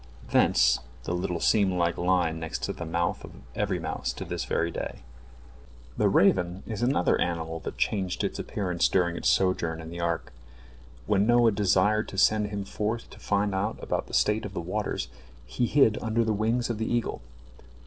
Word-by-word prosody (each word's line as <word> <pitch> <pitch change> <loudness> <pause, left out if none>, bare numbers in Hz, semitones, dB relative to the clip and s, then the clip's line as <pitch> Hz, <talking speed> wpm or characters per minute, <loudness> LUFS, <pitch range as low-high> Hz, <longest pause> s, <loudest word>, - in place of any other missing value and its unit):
Thence 60 0 +4 0.2
the 85 - -3
little 90 -1 -2
seam 100 -1 +3
like 85 -1 +1
line 85 -2 +1
next 80 0 -5
to - - -1
the 85 - -7
mouth 85 +1 -1
of - - -10 0.2
every - - -1
mouse 60 - -3
to - - -7
this - - -3
very 85 0 0
day. - - -6 0.9
The 105 - +2
raven 95 -2 +3
is 110 -1 -5
another 120 -7 +2
animal 80 -1 -2
that - - -7
changed 95 -3 -1
its - - -2
appearance 90 -4 0
during 85 -2 +1
its - - +1
sojourn 85 -4 +1
in 80 0 -8
the 85 - -7
ark. 85 -1 -2 0.7
When 105 0 +2
Noah 120 -1 +5
desired 105 +1 +2
to 95 - -8
send 105 +1 +3
him 100 -1 -4
forth 110 +3 -3
to - - -13
find 100 0 0
out 100 +3 -1
about - - -2
the - - -4
state 105 +1 +2
of 100 -1 -7
the - - -1
waters, 100 +5 -3 0.4
he 120 - -1
hid 135 -6 +4
under 115 0 +1
the 110 -1 0
wings 115 +3 0
of 110 - -4
the 110 - -2
eagle. 120 -1 -1
95 Hz, 190 wpm, -27 LUFS, 85-110 Hz, 0.9 s, Noah